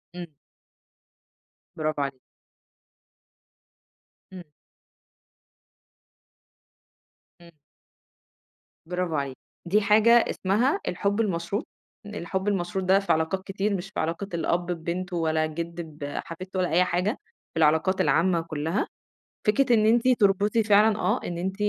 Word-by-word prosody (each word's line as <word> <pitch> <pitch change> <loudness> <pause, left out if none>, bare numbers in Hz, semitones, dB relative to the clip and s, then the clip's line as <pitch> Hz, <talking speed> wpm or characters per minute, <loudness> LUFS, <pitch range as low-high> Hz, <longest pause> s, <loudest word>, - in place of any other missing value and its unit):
إمم. 175 -1 -6 1.5
برافو 155 -2 -2
عليكِ. 140 -2 -3 2.1
إمم. 185 -1 -8 3.0
إمم. 170 0 -15 1.3
برافو 180 -1 -2
عليكِ، 140 -2 -2 0.3
دي 200 +5 +2
حاجة 215 +3 +4
اسمها 235 - +2
الحب 200 +4 0
المشروط، 195 0 -2 0.4
الحب 190 -1 -4
المشروط 190 -1 -1
ده 190 +1 +5
في 200 - -1
علاقات 160 +4 -1
كتير 195 +2 -2
مش 190 +1 -5
في 195 - -5
علاقة 165 +5 -2
الأب 170 +1 0
ببنته 175 +2 -3
ولا 160 -1 +1
الجد 170 +2 -5 0.2
بحفيدته 170 +6 -5
ولا 180 - +1
أي 180 +3 +4
حاجة، 180 +4 -1 0.4
في - - -8
العلاقات 160 +5 +3
العامة 170 -1 +2
كلّها، 160 +3 -2 0.6
فكرة 245 +4 +3
إن 215 -1 +3
أنتِ 235 +3 +3
تربطي 210 -1 +3
فعلًا 210 +1 +4
آه - - +1
إن 175 - -4
أنتِ 190 +2 -3
185 Hz, 115 wpm, -26 LUFS, 165-205 Hz, 3.0 s, ده